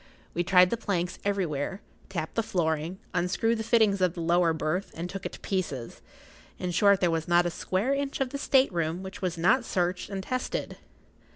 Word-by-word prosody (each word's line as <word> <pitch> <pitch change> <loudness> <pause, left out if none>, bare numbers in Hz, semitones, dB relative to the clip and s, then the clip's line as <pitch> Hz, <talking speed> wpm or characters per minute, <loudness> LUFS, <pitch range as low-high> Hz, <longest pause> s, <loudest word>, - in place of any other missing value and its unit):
We 175 - 0
tried 180 0 +5
the 235 - 0
planks 180 -5 -2
everywhere, 190 -4 -1 0.3
tapped 165 -5 -4
the 225 - +1
flooring, 165 -3 -1 0.2
unscrewed 195 +6 +1
the - - -2
fittings 215 -4 +3
of 180 -2 +2
the 170 - -4
lower 170 0 +3
berth 160 +4 -1
and 170 +2 -4
took 195 +1 -5
it - - -12
to - - -9
pieces—in 180 +1 -6
short, 200 +2 +4
there 175 -2 +3
was 165 -1 -1
not 175 0 +4
a 175 - 0
square 195 +10 -1
inch 275 0 -2
of 265 -2 -1
the 280 - -4
state 265 -6 +3
room 170 +2 -1
which 190 +1 -8
was 180 -2 -2
not 190 +10 +3
searched 180 -4 -1
and 195 -2 -4
tested. 255 - -3
185 Hz, 195 wpm, -28 LUFS, 170-205 Hz, 0.3 s, tried